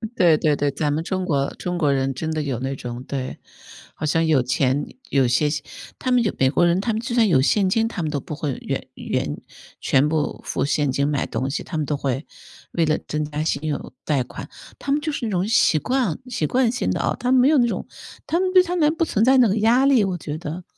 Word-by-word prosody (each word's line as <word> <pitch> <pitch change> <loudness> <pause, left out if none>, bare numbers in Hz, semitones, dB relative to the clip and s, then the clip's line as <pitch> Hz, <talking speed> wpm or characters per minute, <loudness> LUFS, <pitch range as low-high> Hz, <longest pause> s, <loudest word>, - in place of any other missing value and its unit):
对 170 -3 +5
对 150 -1 +2
对， 145 -1 0
咱 145 +1 -1
们 155 +2 -1
中 185 0 -2
国 140 -4 0
中 180 -1 -3
国 145 -4 +2
人 135 0 0
真 160 +3 -3
的 155 -1 -1
有 135 -5 -2
那 135 +1 -3
种 125 0 -7
对， 130 -1 -5 0.6
好 - - -9
像 165 +2 +2
有 150 -5 +3
钱 130 +3 0 0.2
有 135 -3 +3
些 130 +5 +2 0.5
他 255 - -1
们 245 -1 +4
就 210 - 0
美 130 0 +4
国 175 +4 +2
人， 175 +3 +2
他 230 - -1
们 215 - -1
就 235 +1 -4
算 230 -3 +4
有 140 -8 +4
现 190 +7 +2
金， 225 +3 +2
他 220 -6 -4
们 155 - -1
都 145 -2 -2
不 150 - -8
会 145 -3 -2
原 - - -3
原 - - -3 0.4
全 140 +2 +2
部 155 -2 -1
付 135 - -1
现 145 -1 +1
金 140 +2 0
买 145 -2 -1
东 130 - -2
西， - - -2
他 160 - -5
们 150 - -1
都 150 - -1
会 135 0 -2 0.5
为 170 - +1
了 155 0 +2
增 150 0 -1
加 150 +1 -3
信 155 -2 -1
用 145 -3 -4
贷 140 -4 +1
款 - - -9 0.3
他 275 - -3
们 290 - +3
就 310 - -2
是 245 -5 -3
那 - - -3
种 185 +2 0
习 220 -7 +4
惯 250 - 0
习 165 -11 -1
惯 250 -2 +2
性 245 - -2
的 - - -1
啊， - - 0
他 250 +1 0
们 260 - +5
没 255 - +5
有 305 -4 +4
那 240 - +4
种 - - -3 0.4
他 335 - 0
们 370 0 +1
对 365 -1 +7
他 355 0 -3
们 310 -1 +2
不 330 - +1
存 220 -7 +1
在 265 +2 +5
那 245 -3 +6
个 205 +3 0
压 235 +5 +4
力， 260 -6 +5
我 185 -2 -1
觉 150 -2 -5
得。 170 +1 -6
160 Hz, 275 characters per minute, -22 LUFS, 140-230 Hz, 0.6 s, 对